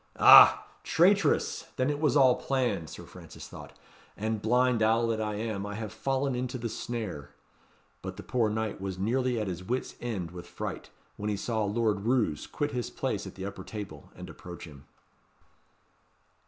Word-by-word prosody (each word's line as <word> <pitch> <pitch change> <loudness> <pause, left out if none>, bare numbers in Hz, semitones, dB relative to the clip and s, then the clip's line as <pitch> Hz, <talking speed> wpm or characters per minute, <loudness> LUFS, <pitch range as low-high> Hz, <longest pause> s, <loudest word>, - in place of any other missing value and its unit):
"Ah! - - +9 0.2
traitress! 185 -2 +2
then 130 +2 +1
it 145 - -3
was 150 -1 +3
all 130 -3 +6
planned," 120 - -1
Sir - - -9
Francis - - -11
thought; - - -12 0.4
"and, 110 0 -2
blind 125 +1 +2
owl 115 +2 +3
that 110 -1 -1
I 105 -1 -2
am, 105 -2 -3
I 105 0 -5
have 110 -1 -5
fallen 135 0 -1
into 125 +1 -3
the 115 -1 -4
snare." 105 - -5 0.7
But - - -7
the - - -8
poor 120 -3 +1
knight 110 -2 -3
was 95 -2 -4
nearly 125 +4 0
at 105 - -1
his 90 -1 -5
wit's 125 +7 -3
end 100 -9 -3
with 90 -1 -9
fright, - - -6 0.3
when 105 +1 -3
he 105 - -1
saw 110 +1 -1
Lord 105 0 +1
Roos 110 - 0
quit 145 0 -2
his 125 -4 -3
place - - -3
at - - -10
the 95 - -6
upper 100 0 -6
table 100 -10 -8
and - - -9
approach 90 0 -10
him. 70 -3 -14
110 Hz, 180 wpm, -29 LUFS, 100-125 Hz, 0.7 s, Ah